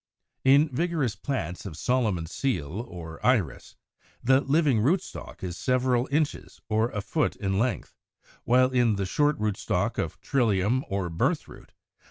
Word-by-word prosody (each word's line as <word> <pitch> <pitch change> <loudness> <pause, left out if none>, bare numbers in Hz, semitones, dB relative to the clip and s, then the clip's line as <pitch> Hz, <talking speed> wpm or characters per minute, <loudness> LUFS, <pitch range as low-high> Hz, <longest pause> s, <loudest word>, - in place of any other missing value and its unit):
In 140 +3 +6
vigorous 150 -4 -1
plants 90 - -4
of 80 -5 -8
Solomon's 105 -10 0
Seal 100 - -2
or 80 -2 -9
Iris, 125 -9 0 0.5
the 130 +2 +4
living 145 -4 +2
rootstock 170 - -2
is 90 -2 -4
several 125 -1 +1
inches 150 +1 -1
or 110 +2 +2
a 105 - -4
foot 155 +9 0
in 95 -1 -1
length; 120 +2 -1 0.5
while 130 +2 +4
in 120 -4 +3
the 100 -1 -1
short 145 +10 +1
rootstock 105 -2 -1
of - - -3
Trillium 115 0 +1
or 95 -3 -2
Birthroot 135 - -2
(Fig. - - -33
120 Hz, 145 wpm, -27 LUFS, 100-135 Hz, 0.5 s, In